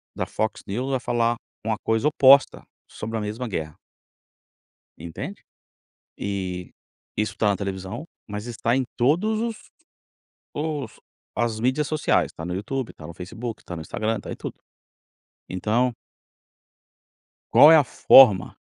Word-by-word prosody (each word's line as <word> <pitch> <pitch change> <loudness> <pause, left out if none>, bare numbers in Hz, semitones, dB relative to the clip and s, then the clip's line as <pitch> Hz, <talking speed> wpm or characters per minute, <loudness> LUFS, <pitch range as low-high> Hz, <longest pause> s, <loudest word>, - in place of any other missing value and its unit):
da - - -2
Fox 110 0 -3
News 125 +7 -3
vai 130 - +1
falar 120 -1 0 0.3
uma 110 -1 0
coisa 110 +6 0
oposta 140 -2 +5 0.2
sobre 110 +1 -5
a - - -2
mesma 110 +4 -4
guerra. 80 -7 -4 1.2
Entende? 80 0 -8 0.8
Eh, 95 -3 -4 0.5
isso 105 0 -2
tá 105 - +2
na 100 - +2
televisão, 100 - -5 0.2
mas 105 +2 -5
está 120 +1 -1
em 130 - +1
todos 180 - +2
os 230 -1 -2 1.0
os 150 -2 -4 0.4
as 115 -1 0
mídias 130 +5 0
sociais, 155 -1 +1
tá 80 - -8
no 90 +1 -3
YouTube, 125 +6 -4
tá 75 - -11
no - - -7
Facebook, 115 +6 -7
tá 90 - -7
no 80 - -6
Instagram, 110 +7 -2
tá - - -8
em - - -5
tudo. - - -6 0.9
Então 115 +6 0 1.6
Qual 150 - +9
é - - +9
a 150 - +6
forma 110 -7 +6
115 Hz, 140 wpm, -24 LUFS, 100-130 Hz, 1.6 s, Qual